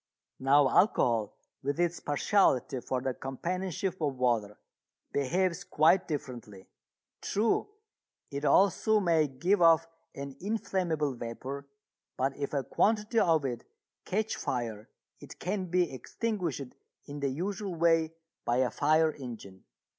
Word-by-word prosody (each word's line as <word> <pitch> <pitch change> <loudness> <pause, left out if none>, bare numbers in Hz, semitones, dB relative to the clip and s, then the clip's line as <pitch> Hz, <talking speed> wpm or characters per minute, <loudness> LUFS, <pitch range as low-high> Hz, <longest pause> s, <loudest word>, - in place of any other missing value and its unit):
Now 135 +1 +5
alcohol, 120 - +2 0.2
with 140 +3 -2
its 175 0 +1
partiality 140 - +2
for 130 +1 -2
the 130 0 -1
companionship 180 +7 -3
of 145 -3 0
water, 115 -5 0 0.6
behaves 175 +6 0
quite 170 +4 +3
differently. 120 - -6 0.6
True, 215 +2 +1 0.6
it 140 +1 -4
also 200 +6 +4
may 165 -5 +3
give 175 +9 +1
off 165 -1 +6 0.3
an 140 -1 -7
inflammable 180 -8 -1
vapour, 130 +4 -6 0.5
but 135 +1 0
if 140 -1 -4
a 140 -2 -1
quantity 215 - +1
of 160 -6 +3
it 120 -3 -3 0.4
catch 215 +3 -1
fire 115 -4 -3 0.3
it - - -12
can 190 +1 -2
be 180 -3 +1
extinguished 170 - -3 0.3
in 145 0 -7
the 140 -1 0
usual 190 +6 -3
way 165 -1 +3 0.3
by 120 - +1
a 130 -2 +2
fire 155 +4 +3
engine. 115 -8 -9
150 Hz, 125 wpm, -30 LUFS, 130-180 Hz, 0.6 s, off